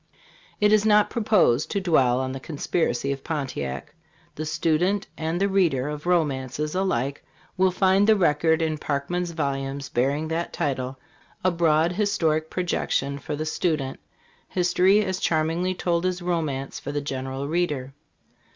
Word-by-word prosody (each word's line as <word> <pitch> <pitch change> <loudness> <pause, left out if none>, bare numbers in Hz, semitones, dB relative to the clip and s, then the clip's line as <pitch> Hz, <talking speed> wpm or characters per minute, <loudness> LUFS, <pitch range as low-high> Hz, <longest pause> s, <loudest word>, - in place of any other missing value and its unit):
It 210 0 +4
is 215 -1 +5
not 210 -1 +4
proposed 210 - +2
to 200 - 0
dwell 135 -9 +3
on 130 0 -2
the 135 - -5
Conspiracy 140 -2 -1
of 135 -1 -4
Pontiac. 130 - -4 0.4
The 155 +1 -5
stu 155 0 +1
dent 195 +3 +1
and 160 +2 -2
the 200 - +2
reader 170 -9 +2
of 150 +2 -6
romances 150 -3 0
alike 140 -8 -1 0.3
will 190 0 +3
find 190 +2 +3
the 220 - +6
record 160 -2 +2
in 155 -1 -1
Parkman's 160 +6 -2
vol 150 -4 -1
umes 135 0 -5
bearing 140 +6 +1
that 165 +1 -2
title: 130 -2 -2 0.5
a 185 - +3
broad 165 -1 +2
historic 170 -6 0
projection 140 -5 -1
for 150 +2 -4
the 155 +2 -3
student; 155 -4 -1 0.5
history 185 +3 +3
as 190 -1 -2
charmingly 165 +3 0
told 170 -1 0
as 180 -1 -2
romance 160 -6 -2
for 145 - -5
the 145 0 -2
general 135 0 -4
reader. 150 -5 -1
160 Hz, 155 wpm, -25 LUFS, 140-180 Hz, 0.5 s, the